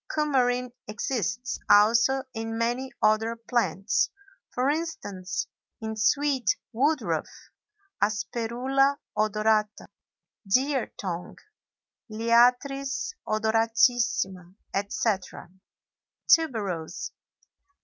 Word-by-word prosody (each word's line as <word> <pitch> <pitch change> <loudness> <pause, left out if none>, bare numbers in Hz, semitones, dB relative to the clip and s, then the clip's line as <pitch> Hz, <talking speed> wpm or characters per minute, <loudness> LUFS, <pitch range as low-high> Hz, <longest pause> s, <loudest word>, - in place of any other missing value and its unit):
Coumarin 250 -5 +1
exists 235 +2 -2
also 230 +6 +5
in 225 -1 -4
many 240 +3 -1
other 220 +2 +3
plants, 225 -6 0 0.4
for 250 +1 0
instance, 280 - -3 0.3
in 220 0 -4
sweet 265 +2 +2 0.2
woodruff 290 +7 0 0.7
(Asperula 240 +7 +1 0.2
odorata), 215 0 +1 0.7
deer 265 +2 +2
tongue 180 -3 -5 0.7
(Liatris 250 - +2
odoratissima), 220 -4 +1 0.2
etc. 200 -3 -2 0.8
TUBEROSE. 210 - +1
230 Hz, 65 wpm, -27 LUFS, 215-260 Hz, 0.8 s, also